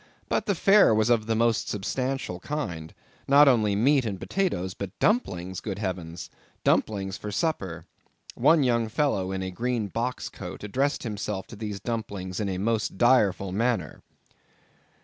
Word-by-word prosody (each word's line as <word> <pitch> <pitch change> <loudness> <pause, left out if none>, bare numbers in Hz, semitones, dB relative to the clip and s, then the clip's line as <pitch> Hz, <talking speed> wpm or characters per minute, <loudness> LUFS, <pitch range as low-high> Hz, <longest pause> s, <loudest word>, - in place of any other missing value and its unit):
But - - 0
the 200 - +2
fare 195 - +5
was 110 +2 +2
of 110 -2 +2
the 115 - +1
most 115 -1 +1
substantial 125 -1 -2
kind—not 140 - 0
only 110 -6 +3
meat 135 +6 +3
and 100 -5 -4
potatoes, 95 - -1
but 100 -1 -7
dumplings; 95 - 0
good 100 -3 -4
heavens! 90 -5 -5 0.3
dumplings 100 -2 +1
for 105 - -6
supper! 95 - -2 0.5
One 160 -3 +4
young 120 -3 +1
fellow 110 -7 0
in 95 0 -3
a 95 - -4
green 115 +1 -2
box 120 +5 -3
coat, - - -8
addressed 135 +8 -1
himself 105 -4 -4
to - - -9
these 105 -2 -5
dumplings 100 -6 -4
in 105 -2 -1
a 95 - -2
most 110 +1 -1
direful 100 -6 +3
manner. 110 -5 -1
110 Hz, 150 wpm, -26 LUFS, 95-125 Hz, 0.5 s, fare